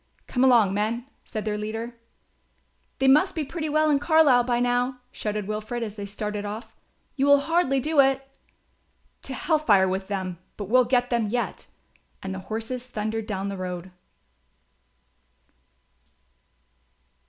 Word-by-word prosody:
"Come 250 - 0
along, 235 -7 +5
men," 220 +4 -1 0.2
said 215 -1 -5
their 210 -1 -1
leader. 225 +3 -4 1.0
"They 265 - +2
must 300 +8 +5
be 315 - -1
pretty 310 +2 -4
well 310 +1 +3
in 285 - +3
Carlisle 290 -5 +5
by 240 -1 +1
now," 245 +1 +1
shouted 210 -2 -3
Wilfred, 215 +3 -3
as 215 -2 -5
they 205 -1 -6
started 210 0 -4
off. 210 +3 -7 0.4
"You 275 -1 +1
will 285 0 +6
hardly 320 -4 +2
do 305 +3 0
it." 270 0 +4 0.9
"To 265 - -5
hell 315 +4 +1
fire 200 -10 +4
with 190 +1 -2
them; 185 -4 -3 0.2
but 205 - -4
we'll 255 +2 +5
get 245 0 +1
them 235 -3 +1
yet"; 240 +3 -3 0.6
and 190 0 -4
the 190 - -5
horses 230 +3 -4
thundered 220 -1 -3
down 195 -1 -3
the 200 - -5
road. 180 0 -5
235 Hz, 150 wpm, -25 LUFS, 210-270 Hz, 1.0 s, will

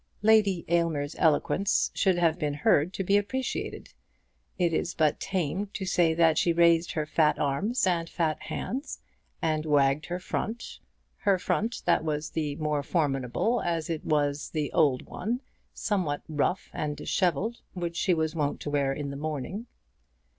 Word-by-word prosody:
Lady 210 -5 +4
Aylmer's 165 -4 0
eloquence 170 +5 +2
should 190 -3 +2
have 170 -1 +2
been 150 -2 -1
heard 150 +2 +3
to 195 - -3
be 200 +2 +3
appreciated. 255 +6 -3 0.6
It 175 -2 +1
is 165 - -1
but 155 -2 +2
tame 190 +2 -2
to 195 - -4
say 175 -3 +2
that 165 -2 +4
she 170 - +2
raised 170 0 +4
her 155 -1 -1
fat 155 0 +2
arms 195 - 0
and 170 -3 0
fat 160 -3 -1
hands, 270 +5 -4 0.5
and 155 -1 +1
wagged 145 -1 +2
her 175 - -2
front, 225 +5 -4 0.4
her 200 -2 +2
front 220 +5 -1
that 170 - +3
was 150 -1 -2
the 150 -3 -2
more 150 -1 -1
formidable 145 - 0
as 165 -1 -1
it 160 - -3
was 145 -1 0
the 150 -2 -2
old 145 -6 +3
one, 240 +3 -3 0.3
somewhat 180 -9 -1
rough 155 +4 -1
and 150 -1 -3
dishevelled, 190 - 0
which 170 -2 -3
she 180 0 +2
was 160 -1 -1
wont 150 -3 -1
to 145 - -4
wear 140 -2 +1
in 140 0 -4
the - - -6
morning. 155 - -4
165 Hz, 160 wpm, -28 LUFS, 150-185 Hz, 0.6 s, Lady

